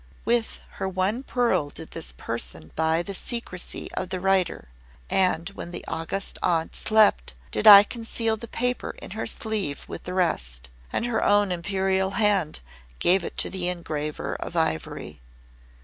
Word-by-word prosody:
"With 235 -1 0 0.2
her 190 - -1
one 190 +6 0
pearl 245 - +1
did - - -7
this - - -5
person 80 +8 -4
buy 160 +1 +2
the 200 - -5
secrecy 195 -3 -4
of 185 - -4
the 185 - -3
writer; 185 - +1 0.4
and 185 -3 +2
when 195 -3 -8
the 175 - -7
August 165 +5 -3
Aunt 165 -2 0
slept, 215 -1 +3 0.2
did 215 - +1
I 200 -1 +12
conceal 225 0 -2
the 235 +2 -9
paper 245 +2 -2
in - - -9
her - - -4
sleeve 210 -10 -2
with - - -8
the 180 - -4
rest, 60 - -1 0.2
and - - -1
her 240 -2 0
own 205 -2 +4
Imperial 190 +1 0
hand 200 - +2 0.4
gave 180 - +3
it - - -6
to - - +1
the 185 -2 -2
engraver 155 -4 -3
of - - -7
ivory." 160 - -2
190 Hz, 160 wpm, -25 LUFS, 165-210 Hz, 0.4 s, I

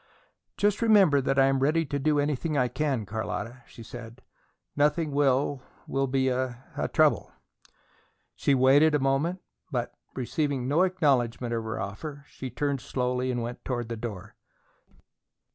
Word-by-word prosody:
"Just 205 +1 +1
remember 195 -11 +5
that 135 +1 0
I 135 - +6
am 135 0 +2
ready 155 +4 +2
to 140 0 -3
do 150 +2 +2
anything 150 +1 -1
I 125 -2 +2
can, 135 -7 -1
Carlotta," 110 +3 -4
she 115 - -12
said. 120 +1 -10 0.5
"Nothing 150 +2 +2
will 140 -1 +2 0.2
will 135 0 0
be 130 0 +1
a 130 -1 -1 0.4
trouble." - - +3 1.0
She 140 - +2
waited 140 +4 +5
a - - +2
moment, 140 +7 0 0.3
but, 125 -3 -2 0.2
receiving 135 0 -1
no 150 +6 +3
acknowledgement 135 -10 +1
of 115 -1 -1
her 110 - -4
offer, 140 +9 -6
she 130 - -7
turned 140 +2 -2
slowly 125 0 -1
and 120 -2 -1
went 120 +1 -6
toward 120 -3 -3
the 115 - -3
door. 110 -5 -7
135 Hz, 150 wpm, -27 LUFS, 125-145 Hz, 1.0 s, I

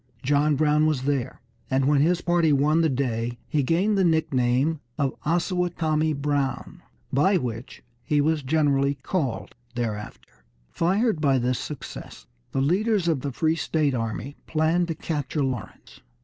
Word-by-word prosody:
John 145 +2 +2
Brown 150 +1 +3
was 145 -5 0
there, 140 -3 -2 0.3
and 130 0 +1
when 145 0 +3
his 175 +3 +2
party 175 -2 +2
won 150 +3 +3
the 160 - +3
day 120 -3 -2
he 150 - +1
gained 185 +9 +1
the - - +4
nickname 145 -2 +1 0.2
of 140 -3 0
"Osawatomie 165 -2 0
Brown," 140 -3 -2 0.3
by 185 +8 +4
which 120 -5 -6 0.2
he 145 +4 0
was 155 +1 +2
generally 140 -1 +1
called 130 - -3 0.2
thereafter. 105 - -6 0.3
Fired 190 +1 +1
by 140 -3 +3
this 125 0 0
success, 150 -4 -8 0.3
the 135 - 0
leaders 190 +5 +1
of 155 -6 +1
the 140 - -3
free 160 +5 +1
state 150 -2 0
army 115 +4 -4
planned 165 +2 +1
to 165 - -3
capture 150 -1 -2
Lawrence. 130 -5 -6
150 Hz, 150 wpm, -25 LUFS, 130-165 Hz, 0.3 s, the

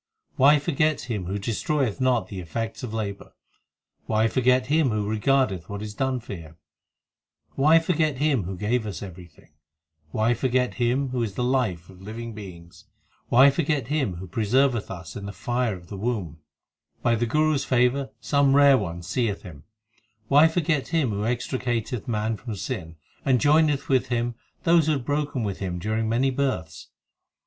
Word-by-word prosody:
4 - - +1
Why 150 +1 +7
forget 150 +1 0
Him 110 -7 -4
who 95 +3 -3
destroyeth 115 +3 -1
not 125 -3 +2
the 100 - -7
effects 115 +6 -4
of 125 -4 -5
labour? 105 -3 -5 0.7
Why 110 +1 +2
forget 125 +1 +2
Him 150 0 +2
who 105 -2 -1
regardeth 110 -4 +1
what 100 0 -5
is 105 -1 -6
done 130 +3 -1
for 110 - -8
Him? 80 -3 -10 1.0
Why 155 +4 +5
forget 160 -4 +1
Him 140 - +1
who 95 +1 -5
gave 110 +4 0
us 95 -4 -5
everything? 90 -4 -12 0.6
Why 110 +7 +1
forget 125 +1 0
Him 130 +3 +1
who 125 -1 -2
is 105 -4 -3
the 125 - -1
life 120 -10 0
of 95 -1 -15
living 115 +3 -7
beings? 90 -5 -11 0.4
Why 130 +4 +7
forget 145 -4 -1
Him 135 - 0
who 95 +2 -8
preserveth 115 +4 +1
us 90 -5 -8
in 100 -1 -6
the - - -5
fire 120 0 -1
of 85 -1 -14
the 100 - -6
womb? 95 -8 -3 0.6
By 120 - +3
the 115 +1 0
Guru 155 +5 +2
s 140 - 0
favour 130 +2 +1
some 135 +4 +2
rare 140 -2 +6
one 85 -3 -5
seeth 100 +3 -1
Him 75 -7 -11 0.6
Why 145 +3 +7
forget 160 -3 0
Him 155 -8 +1
who 105 +1 -2
extricateth 120 -1 -2
man 110 -1 -1
from 115 -2 -6
sin, 95 -6 -5 0.3
And 130 -2 +3
joineth 150 0 +3
with 130 -1 +2
Him 120 -1 -1 0.3
those 165 -2 +4
who 155 - +3
had 135 -4 -3
broken 145 -3 -1
with 100 -3 -3
Him 90 -3 -3
during 110 +4 -1
many 130 +4 +2
births 95 - -3
120 Hz, 175 wpm, -25 LUFS, 100-135 Hz, 1.0 s, Why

